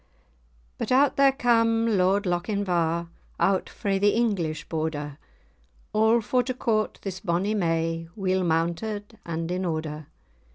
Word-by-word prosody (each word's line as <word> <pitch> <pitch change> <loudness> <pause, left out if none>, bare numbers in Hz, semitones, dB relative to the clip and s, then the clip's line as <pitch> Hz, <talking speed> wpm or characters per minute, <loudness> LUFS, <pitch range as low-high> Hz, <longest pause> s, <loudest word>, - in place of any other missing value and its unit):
But - - -3
out 270 +2 +4
there 275 -1 +5
cam 230 -3 +2
Lord 190 +2 +3
Lochinvar, 175 -2 0 0.3
Out 195 -1 +2
frae 195 -1 -1
the 205 +1 +3
English 175 -10 -1
Border, 155 -2 -3 0.7
All 220 +2 +4
for 250 +3 +1
to 255 0 -3
court 220 -4 0
this 190 -2 -4
bonny 185 +5 0
may, 165 -3 0
Weel 190 -2 0
mounted, 180 +6 -2
and 165 0 -3
in 180 +1 -1
order. 155 -3 -3
190 Hz, 130 wpm, -26 LUFS, 165-220 Hz, 0.7 s, there